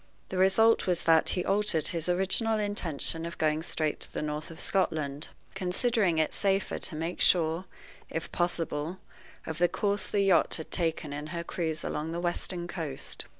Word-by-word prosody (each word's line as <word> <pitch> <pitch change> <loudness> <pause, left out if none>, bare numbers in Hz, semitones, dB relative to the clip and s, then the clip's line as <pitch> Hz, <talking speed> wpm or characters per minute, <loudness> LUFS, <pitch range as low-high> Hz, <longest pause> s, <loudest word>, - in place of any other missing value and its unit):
The 185 - -2
result 210 +5 +5
was 180 -2 +1
that 160 -1 +5
he 180 - 0
altered 195 -5 +2
his 165 0 -2
original 190 +5 +2
intention 170 -6 -2
of 170 0 -5
going 155 0 +1
straight 155 -2 -1
to - - -5
the - - -3
north 150 0 -3
of 165 0 -10
Scotland, 155 -6 0 0.3
considering 195 0 +1
it 155 -1 +1
safer 195 -1 +1
to 165 - -3
make 165 +3 -3
sure, 165 +1 +3 0.4
if - - -4
possible, 170 -1 -1 0.5
of 160 0 -5
the 175 0 +4
course 205 0 -1
the 205 - +1
yacht 190 -4 +4
had 160 - -7
taken 165 -4 -1
in 150 +1 -5
her 170 +1 -4
cruise 160 -2 -2
along 155 +2 -3
the 170 - -2
western 175 0 -2
coast. 160 -7 -4
170 Hz, 175 wpm, -29 LUFS, 160-190 Hz, 0.5 s, result